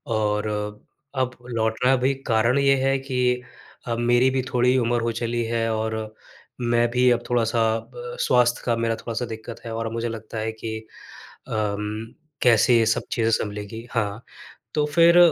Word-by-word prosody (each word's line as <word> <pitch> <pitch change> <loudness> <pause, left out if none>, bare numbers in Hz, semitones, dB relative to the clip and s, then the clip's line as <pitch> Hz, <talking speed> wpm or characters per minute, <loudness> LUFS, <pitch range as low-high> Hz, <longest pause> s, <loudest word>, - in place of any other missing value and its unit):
और 105 0 0 0.7
अब 130 -1 0 0.2
लौटना 115 +3 +2
भी 130 +2 +2
कारण 115 +2 +3
ये 140 0 +4
है 135 0 +3
कि 125 -2 0 0.5
अब 115 -1 -1
मेरी 120 +2 +4
भी 130 0 0
थोड़ी 125 +1 +3
उम्र 120 -1 +1
हो 115 0 0
चली 115 +1 -2
है, 115 0 0
और 110 0 -3 0.5
मैं 120 0 +2
भी 125 +1 +4
अब 120 0 +1
थोड़ा-सा 115 -1 +1
अब 115 - -7 0.4
स्वास्थ्य 120 -1 +3
का 120 - +2
मेरा 115 0 0
थोड़ा-सा 115 +2 -4
दिक्कत 115 0 -8
है 115 - -5
और 115 0 -2
मुझे 115 0 -2
लगता 110 0 -7
है 110 +1 -2
कि 110 0 -5 0.7
अम, 105 +1 -3 0.3
कैसे 120 0 +5
ये 115 - +3
सब 110 - +1
चीज़ें 115 -1 +1
सँभलेंगी? 105 +2 -3
हाँ। 110 -1 -2 0.5
तो 150 -1 +2
फिर 170 +3 +5
115 Hz, 165 wpm, -24 LUFS, 110-125 Hz, 0.7 s, कैसे